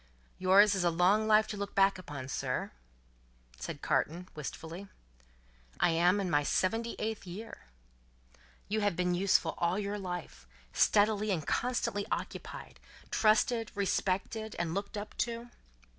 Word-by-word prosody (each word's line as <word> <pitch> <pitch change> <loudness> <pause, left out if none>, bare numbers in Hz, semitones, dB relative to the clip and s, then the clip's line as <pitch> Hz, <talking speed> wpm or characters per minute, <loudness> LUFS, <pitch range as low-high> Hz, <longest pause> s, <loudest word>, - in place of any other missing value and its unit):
"Yours 195 +3 +6
is 190 -2 0
a 175 - +4
long 185 +6 +3
life 215 0 +5
to 215 - -5
look 200 0 -5
back 195 -1 +4
upon, 145 -7 -7
sir?" 135 - -2 0.9
said - - -6
Carton, 175 +4 0
wistfully. 160 +5 -7 0.9
"I 175 - +4
am 175 +4 +3
in 195 - -1
my 145 -4 +3
seventy 225 +10 0
eighth 215 -2 -4
year." 205 - -8 1.0
"You 215 +1 0
have 205 -3 +1
been 180 0 +1
useful 180 -2 +2
all 170 +2 +1
your 205 0 -2
life; 180 - -6 0.3
steadily 210 0 +3
and 165 -7 -1
constantly 240 -5 -1
occupied; - - -5 0.3
trusted, 225 +1 +2
respected, 200 +2 -1
and 165 -1 -1
looked 200 +3 -4
up 205 +1 -6
to?" 235 0 -2
195 Hz, 140 wpm, -31 LUFS, 175-215 Hz, 1.0 s, Yours